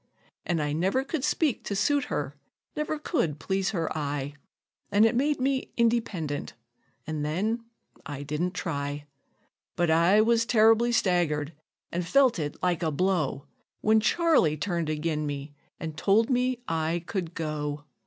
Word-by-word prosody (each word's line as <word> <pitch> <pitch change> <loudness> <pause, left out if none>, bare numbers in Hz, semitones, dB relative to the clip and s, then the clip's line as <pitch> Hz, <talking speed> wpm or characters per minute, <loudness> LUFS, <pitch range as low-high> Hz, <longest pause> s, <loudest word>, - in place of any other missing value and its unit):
An' 175 -2 +1
I 150 0 -1
never 190 - +1
could 275 0 -3
speak 300 -3 +1
to 200 - -2
suit 285 +7 +2
her, 145 0 -3 0.4
never 300 +1 -2
could 175 - -1
please 190 +5 -1
her 165 -7 -2
eye, 145 -2 -3 0.6
An' 210 +2 +5
it 225 - +3
made 285 +3 +1
me 265 0 0
independent, 225 -11 0 0.5
an' 155 -2 -3
then 210 +10 -1 0.4
I 145 -1 -6
didn't 160 +6 -2
try; 145 -4 -3 0.7
But 175 -2 +2
I 170 +6 +5
was 230 +1 +4
terribly 225 +1 +5
staggered, 170 -8 +1 0.4
an' 175 - -1
felt 255 +3 +3
it 145 -2 -3
like 180 -2 +1
a 165 - +1
blow, 155 -4 0 0.4
When 220 +1 +4
Charley 270 - +3
turned 170 -1 -2
ag'in 155 0 -1
me, 145 0 -5 0.3
an' 160 -3 -4
told 215 - +2
me 250 0 +1
I 165 +1 -1
could 175 -5 -4
go. 150 -2 -3
175 Hz, 150 wpm, -27 LUFS, 150-230 Hz, 0.7 s, An